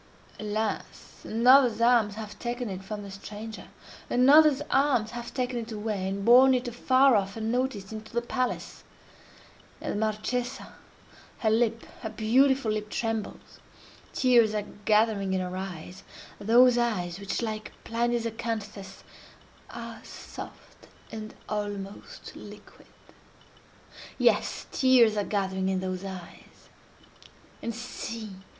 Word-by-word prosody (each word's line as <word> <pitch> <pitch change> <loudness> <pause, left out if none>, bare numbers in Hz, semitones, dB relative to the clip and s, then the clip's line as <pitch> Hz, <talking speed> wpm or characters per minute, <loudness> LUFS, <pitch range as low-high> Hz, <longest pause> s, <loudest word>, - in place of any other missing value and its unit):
Alas! 215 0 -4
another's 245 0 +5
arms 230 -3 +4
have 215 -1 -8
taken 240 -1 -3
it 190 0 -6
from 205 +1 -6
the 200 - -9
stranger—another's 250 +8 +1
arms 265 -6 +2
have 240 0 -6
taken 250 -2 -2
it 230 0 -7
away, 210 -3 -3
and 195 +1 -3
borne 255 +3 +7
it 250 0 -2
afar 255 +2 +4
off, 195 0 0
unnoticed, 225 -2 -2
into 220 0 -8
the 235 - 0
palace! 255 +1 -3 1.0
And - - -3
the - - -2
Marchesa! 230 +4 -2 0.6
Her 220 - +1
lip—her 230 0 -1
beautiful 245 +3 +3
lip 210 0 -3
trembles; 225 -2 -4 0.5
tears 235 -4 +4
are 210 -1 -1 0.2
gathering 210 -3 +2
in - - +1
her 180 0 -4
eyes—those 195 +6 +1
eyes 185 -7 -1
which, 200 +4 -3
like 215 -1 -4
Pliny's 235 0 0
acanthus, 215 -4 -5 0.7
are - - -8
"soft - - -11 0.2
and 215 -1 -7
almost 205 -1 -6
liquid." - - -13 1.3
Yes! - - +2
tears 250 -5 +5
are 205 - 0
gathering 190 -2 -1
in 190 -1 0
those 185 0 -4
eyes—and 190 +4 -11
see! 230 -2 -6
220 Hz, 115 wpm, -27 LUFS, 205-240 Hz, 1.3 s, borne